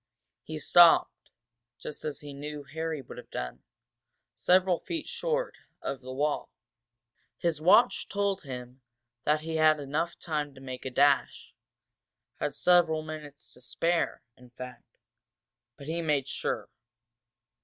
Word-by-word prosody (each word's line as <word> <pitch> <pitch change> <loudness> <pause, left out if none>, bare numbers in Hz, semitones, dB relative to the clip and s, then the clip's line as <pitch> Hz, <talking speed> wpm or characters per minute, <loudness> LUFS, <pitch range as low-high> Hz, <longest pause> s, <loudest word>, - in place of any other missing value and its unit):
He 155 - -6
stopped, 170 +2 +5 0.5
just 150 - -7
as 150 - -4
he 145 -1 -8
knew 145 +1 -6
Harry 160 +1 -4
would 125 - -10
have - - -13
done, 60 0 -5 0.7
several 180 -1 +3
feet 330 -2 -4
short - - -1 0.2
of 135 -1 -4
the 130 0 -8
wall. 145 +3 -1 0.9
His 165 -3 -1
watch 230 +9 +5
told 200 -1 0
him 125 -2 -8 0.4
that 150 +1 +3
he 160 0 -3
had 155 0 +6
time - - -9
enough 150 +4 -2
to 150 -3 -2
make 130 -1 -7
a - - -1
dash, 140 +2 +2 0.9
had - - -2
several 170 -3 +4
minutes 155 -2 -8
to 125 - -16
spare, 165 +7 0
in 125 0 -17
fact. 125 +1 -11 0.8
But 140 - -10
he 165 +3 -2
made 150 -4 +1
sure. - - -2
150 Hz, 135 wpm, -29 LUFS, 135-170 Hz, 0.9 s, had